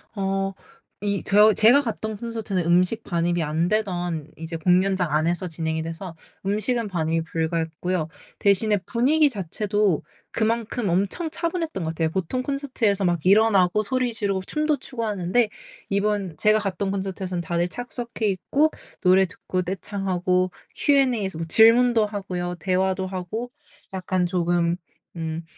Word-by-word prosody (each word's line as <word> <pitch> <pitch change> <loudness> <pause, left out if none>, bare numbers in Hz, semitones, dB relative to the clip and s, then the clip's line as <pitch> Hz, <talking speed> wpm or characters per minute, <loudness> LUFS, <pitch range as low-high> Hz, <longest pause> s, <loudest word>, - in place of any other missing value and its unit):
어 195 0 -1 0.5
이 200 -1 -1
저 210 +2 +6
제가 235 +8 +6
갔던 220 -4 -4
콘서트는 220 -5 -3
음식 180 +6 +2
반입이 170 -1 0
안 160 +2 0
되던 175 -7 -1
이제 165 +1 -5
공연장 180 +1 +2
안에서 170 +4 +1
진행이 160 -1 -2
돼서 165 +2 -6 0.3
음식은 215 +3 0
반입이 165 -2 0
불가했고요. 165 +1 -2 0.3
대신에 205 +1 +3
분위기 290 +6 +3
자체도 205 - 0 0.3
그만큼 230 -1 -1
엄청 200 - 0
차분했던 335 - -2
것 - - -1
같아요. 160 0 0
보통 190 +9 -2
콘서트에서 255 -8 0
막 175 -3 0
일어나고 200 -1 +4
소리 250 +2 -1
지르고 200 -3 -1
춤도 305 +8 0
추고 250 -2 -6
하는데 210 +2 +1 0.4
이번 200 -4 -1
제가 215 0 +4
갔던 195 -1 -2
콘서트에서는 190 -2 -3
다들 170 +1 -1
착석해 240 +1 -3
있고 275 - +1 0.3
노래 185 +1 +5
듣고 185 0 -4
떼창하고 185 -1 -1 0.2
Q&A에서 245 - +2
뭐 165 - -4
질문도 230 +3 +5
하고요. 185 -4 -4
대화도 190 0 0
하고 190 +6 -5 0.4
약간 185 -1 -1
조금 175 -1 +1 0.4
음 165 0 -4
195 Hz, 320 characters per minute, -24 LUFS, 175-220 Hz, 0.5 s, 저